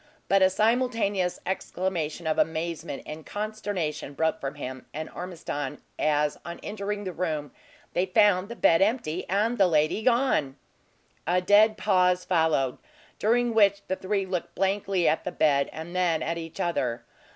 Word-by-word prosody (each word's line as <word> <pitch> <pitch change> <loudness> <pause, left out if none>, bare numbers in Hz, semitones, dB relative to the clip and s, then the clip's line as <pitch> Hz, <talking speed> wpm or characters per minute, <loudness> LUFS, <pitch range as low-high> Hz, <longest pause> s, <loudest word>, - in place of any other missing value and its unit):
But 195 0 +4
a 190 - +6
simultaneous 215 -3 +1
exclamation 175 -3 -3
of 155 -1 0
amazement 165 -2 -2
and 155 +1 -7
consternation 205 -9 -4
broke 160 +2 0
from 140 +1 -4
him 130 -2 -7
and 155 +1 -5
Ormiston, 155 -5 -5 0.2
as 150 -1 +1
on 170 0 -7
entering 205 0 -4
the 185 -2 -4
room 155 -5 -3 0.4
they 180 +2 +1
found 200 0 +3
the 235 - -6
bed 165 -7 +4
empty, 195 -5 0
and 215 +5 +1
the 195 - +6
lady 155 +4 +2
gone! 235 - +2 0.7
A 180 +2 +3
dead 210 +4 +5
pause 180 -2 +2
followed, 160 -7 +1 0.4
during 240 +2 +2
which 200 -2 +4
the 190 - 0
three 195 +1 -1
looked 185 -2 -4
blankly 195 -1 +1
at 155 - +2
the 180 - -3
bed, 140 -4 +2
and 160 +3 -8
then 175 -3 +1
at 170 +1 -2
each 165 -1 -8
other. 125 -9 -1
180 Hz, 155 wpm, -27 LUFS, 155-205 Hz, 0.7 s, a